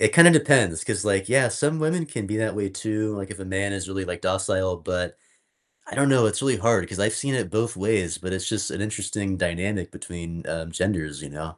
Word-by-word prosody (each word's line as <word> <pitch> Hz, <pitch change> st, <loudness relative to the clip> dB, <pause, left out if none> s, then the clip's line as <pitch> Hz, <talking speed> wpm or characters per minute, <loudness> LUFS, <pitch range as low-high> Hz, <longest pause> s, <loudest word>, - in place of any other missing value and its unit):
it -, -, +4 dB
kinda 170 Hz, +1 st, +10 dB
depends 130 Hz, -, +4 dB
'cause, 105 Hz, -1 st, -1 dB
like, 95 Hz, -1 st, +1 dB
yeah, 130 Hz, 0 st, +5 dB
some 150 Hz, +6 st, 0 dB
women 160 Hz, +2 st, +1 dB
can 115 Hz, -9 st, -5 dB
be 105 Hz, -, -2 dB
that 110 Hz, -2 st, -1 dB
way 100 Hz, -2 st, -1 dB
too, 110 Hz, +2 st, -2 dB
like, 100 Hz, +1 st, -6 dB
if 105 Hz, -, -7 dB
a 95 Hz, -, -7 dB
man 95 Hz, +1 st, -1 dB
is 95 Hz, -1 st, -4 dB
really, 95 Hz, 0 st, -3 dB
like, 90 Hz, -1 st, -5 dB
docile, 95 Hz, -1 st, 0 dB
but 90 Hz, +1 st, -3 dB, 0.7 s
I -, -, -7 dB
don't 140 Hz, +1 st, +3 dB
know, 130 Hz, -4 st, +5 dB
it's 105 Hz, 0 st, -1 dB
really 135 Hz, -2 st, +2 dB
hard 115 Hz, -6 st, +2 dB
'cause 95 Hz, -, -7 dB
I've 105 Hz, +2 st, +2 dB
seen 140 Hz, +4 st, -1 dB
it 120 Hz, -, -1 dB
both 115 Hz, +1 st, 0 dB
ways, 95 Hz, -3 st, 0 dB
but 95 Hz, +1 st, -6 dB
it's 95 Hz, -1 st, -3 dB
just 105 Hz, -2 st, -2 dB
an -, -, -5 dB
interesting 100 Hz, -2 st, -2 dB
dynamic 90 Hz, +1 st, -2 dB
between, 85 Hz, -1 st, -8 dB
um, 80 Hz, 0 st, -4 dB
genders, 80 Hz, -6 st, -2 dB
you -, -, -8 dB
know? 80 Hz, +4 st, -8 dB
100 Hz, 235 wpm, -24 LUFS, 90-110 Hz, 0.7 s, kinda